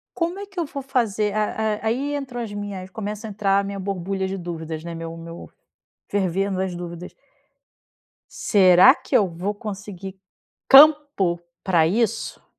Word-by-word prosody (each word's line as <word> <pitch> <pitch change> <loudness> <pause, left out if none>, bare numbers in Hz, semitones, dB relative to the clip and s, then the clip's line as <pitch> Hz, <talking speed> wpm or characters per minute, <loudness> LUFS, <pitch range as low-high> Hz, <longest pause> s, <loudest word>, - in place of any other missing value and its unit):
como 340 +2 -2
é 405 - -6
que 385 -3 -6
eu 335 - 0
vou 280 -1 -6
fazer 220 -6 0
a 215 0 +1 0.4
a - - -6
aí 275 +6 -1
entram 260 -4 -5
as 220 -3 -5
minhas 205 -2 -6
começa 210 +2 -6
a 215 - -7
entrar 200 -1 +1
a 200 - 0
minha 200 0 -5
borbulha 190 0 -3
de 195 - -3
dúvidas, 165 -2 -6
né, 170 - -6
meu 165 0 -6
meu 165 0 -10 0.6
fervendo 195 0 -1
as 190 -2 -2
dúvidas. 175 0 -8 1.2
Será 190 +4 +6
que 270 - -1
eu 200 -5 +3
vou 180 +5 -4
conseguir 200 -2 -8 0.5
campo 280 - +6 0.2
pra 170 -5 +3
isso? 220 +6 -1
200 Hz, 160 wpm, -23 LUFS, 180-230 Hz, 1.2 s, Será